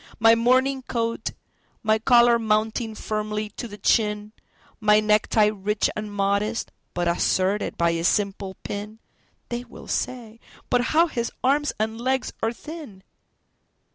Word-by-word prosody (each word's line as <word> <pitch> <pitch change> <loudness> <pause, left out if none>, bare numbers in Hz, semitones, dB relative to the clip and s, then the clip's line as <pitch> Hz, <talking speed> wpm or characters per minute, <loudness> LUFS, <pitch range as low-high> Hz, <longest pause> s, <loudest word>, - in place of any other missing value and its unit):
My 225 0 +7
morning 260 +3 +3
coat, 230 -2 -2 0.5
my 220 0 +3
collar 235 0 +5
mounting 220 +1 0
firmly 215 0 -3
to 240 - -6
the 205 -2 -10
chin, 210 0 +1 0.5
My 210 -1 +5
necktie 215 0 +3
rich 210 +1 0
and 215 0 -5
modest, 205 +3 0 0.2
but 175 0 0
asserted 185 +3 +1
by 170 0 +3
a 165 0 -2
simple 195 0 0
pin—(They 215 +3 -8
will 235 - -13
say: 230 -3 -3 0.3
"But 245 0 +3
how 335 - +7
his 235 -8 -3
arms 290 +3 +2
and 220 +1 -2
legs 260 +1 0
are 225 - +1
thin!") 275 - -10
220 Hz, 135 wpm, -24 LUFS, 210-235 Hz, 0.5 s, My